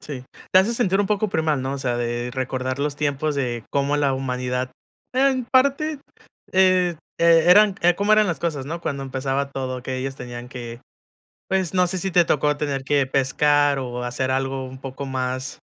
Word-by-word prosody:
Sí, 130 -4 -7 0.3
te 185 - +8
hace 220 +5 +2
sentir 195 -5 +1
un 205 - +1
poco 210 0 0
primal, 155 -6 0
¿no? 135 +1 -2
O - - -5
sea, 125 -2 -1
de 120 0 -2
recordar 130 0 -3
los 145 0 -2
tiempos 150 0 -1
de 120 -4 -2
cómo 140 +1 +1
la 140 -2 +2
humanidad 125 -1 -2 0.4
en 260 -1 +2
parte, 280 +4 +2 0.5
eh, 185 -2 +3 0.2
e 165 -1 +5
eran 205 +1 +6
,eh, 175 0 +5
cómo 205 +3 +1
eran 215 -1 +5
las 170 - -2
cosas, 150 -6 -2
¿no? 165 +3 -5
Cuando 140 -4 -3
empezaba 135 +1 -2
todo 130 -2 -4
que 130 0 -4
ellos 135 +1 -4
tenían 120 0 -8
que, 120 -2 -8 0.7
pues 190 -2 0
no 180 0 +4
sé 185 0 -1
si 190 +1 -1
te 175 -1 +5
tocó 150 -1 +1
tener 140 -3 -2
que 140 -1 +2
pescar, 145 +2 +2
o 125 -1 -4
hacer 130 +2 -2
algo 135 0 -1
un 130 0 -10
poco 135 +1 -6
más 130 0 -3
140 Hz, 195 wpm, -22 LUFS, 130-175 Hz, 0.7 s, te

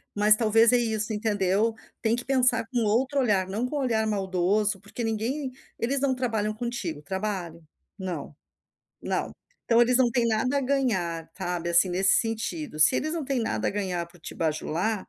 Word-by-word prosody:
mas 210 +1 +6
talvez 225 +1 +4
é 245 - +5
isso, 220 -2 -1
entendeu. 210 0 +1 0.3
Tem 225 0 +2
que 245 - -5
pensar 255 -3 +3
com 245 - 0
outro 260 +7 +1
olhar, 205 -7 +2
não 215 +6 -2
com 300 - -5
olhar 230 -6 0
maldoso, 195 +1 0
porque 205 +4 -7
ninguém 245 +5 -2 0.3
eles 265 +4 0
não 265 -2 +1
trabalham 220 -4 -1
contigo, 215 -10 -4
trabalham? 185 -1 -4 0.4
Não, 175 -6 -5 0.7
não. - - -2 0.3
Então 235 0 +4
eles 245 +1 +3
não 245 -2 +4
têm 235 -1 +1
nada 250 +5 +1
a - - 0
ganhar, 190 -12 -1
sabe, 175 -2 -3
assim, 170 +2 +5
nesse 190 +2 +3
sentido, 200 -9 -3
se 155 +11 +6
eles 310 +4 -1
não 325 -3 -3
têm 270 -2 -1
nada 225 - -1
a - - -5
ganhar 185 -4 -2
por 170 +1 -20
te - - -9
bajular 165 +6 -1
215 Hz, 180 wpm, -26 LUFS, 190-245 Hz, 0.7 s, mas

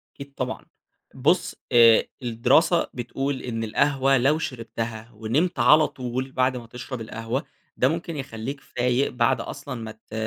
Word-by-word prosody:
أكيد 140 0 -10
طبعًا. 130 0 -4 0.5
بُص، - - +1 0.2
آآ، 115 -2 +7 0.2
الدراسة 125 +9 +3
بتقول 135 +2 -3
إن 115 -2 -3
القهوة 135 +4 +2
لو 140 +5 +3
شربتها 115 -4 -5
ونِمت 120 +12 0
على 155 0 +6
طول 130 +1 -4
بعد 130 0 +1
ما 120 -2 -9
تشرب 125 +1 -7
القهوة، 115 +5 -3 0.3
ده 130 - +4
ممكن 165 +2 -3
يخلّيك 135 +1 -5
فايق 125 +2 0
بعد 120 -2 +2
أصلًا - - -6
ما 110 -1 -6
ت 110 0 -18
125 Hz, 145 wpm, -24 LUFS, 115-140 Hz, 0.5 s, آآ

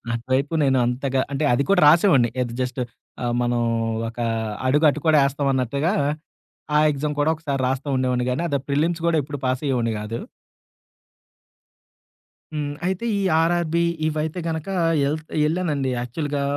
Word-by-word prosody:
అటువైపు 130 +5 -1
నేనంతగా 130 0 +1
అంటే 140 +2 -1
అది 120 - +2
కూడా 195 -2 +4
రాసేవాడిని. 150 - +5
ఏది 120 -2 -3
జస్టు 125 0 -2 0.4
ఆహ్, 120 0 0
మనం 120 0 +1 0.5
ఒక 115 - -11 0.5
అడుగు 150 +4 +3
అటు 150 - -2
కూడా 155 -1 +5
ఎస్తాం 140 +1 -2
అన్నట్టుగా, 140 +6 0 0.9
ఆ - - +5
ఎగ్జామ్ 150 +1 -3
కూడా 145 +2 +3
ఒకసారి 145 -4 -3
రాస్తూండేవాడిని 130 -2 0
గాని, 130 +7 -1
అద 140 - +1
ప్రిల్లిమ్స్ 160 +4 0
కూడా 165 -1 +3
ఎప్పుడు 145 +1 -6
పాసయ్యేవొడిని 130 -3 0
గాదు. 110 +2 -5 2.3
హ్మ్. 145 -1 -3
అయితే 190 +4 -1
ఈ - - -1 0.2
ఆర్ఆర్‌బి 170 0 +1 0.2
ఇవైతే 155 +2 -2
గనక, 160 0 -3 0.4
ఎళ్త్ 155 +2 -4 0.2
ఎళ్ళానండి. 155 -5 -1
యాక్చువల్‌గా 140 +4 -3
140 Hz, 135 wpm, -23 LUFS, 130-155 Hz, 2.3 s, రాసేవాడిని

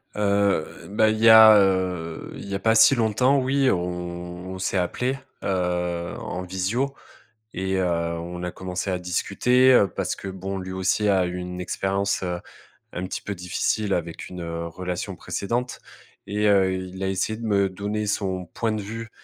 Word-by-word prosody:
Heu 100 -4 +2 0.2
bah, 110 +2 +3
il 110 0 -1
y 115 0 +6
a, 110 -1 +10
heu, 95 -4 0
il - - -8
y - - -4
a - - -2
pas 110 +3 +3
si 110 +4 +7
longtemps, 125 +4 +3
oui, 135 +1 +2
on 90 +1 -4
s'est 95 +1 -1
appelés, 125 +9 -1 0.3
heu, 90 -2 -1
en 90 -1 -5
visio 95 +9 -1 0.6
et 95 0 -1
heu, 95 - +1
on 85 +1 -2
a 90 - -2
commencé 95 +2 -4
à 90 - -1
discuter 125 +7 +3
parce - - -2
que, - - -9
bon, 95 +1 -5
lui 95 0 -6
aussi 95 +3 +1
a 95 -2 +3
eu 90 +1 -4
une 90 0 -5
expérience, 95 +2 -1
heu, 90 -1 -3 0.5
un 90 - -4
petit - - -5
peu 105 - -4
difficile 95 +3 -1
avec 85 -1 -5
une 90 -1 -7
relation 85 +2 -4
précédente. 120 +5 -3 0.5
Et 105 +1 -1
heu, 95 -2 +4
il 95 0 -6
a - - 0
essayé 95 +3 -1
de 115 - -5
me 100 -2 +2
donner 105 +3 -3
son 95 -3 -2
point 110 +6 -2
de 110 -1 -2
vue 115 +3 -7
95 Hz, 175 wpm, -24 LUFS, 90-105 Hz, 0.6 s, a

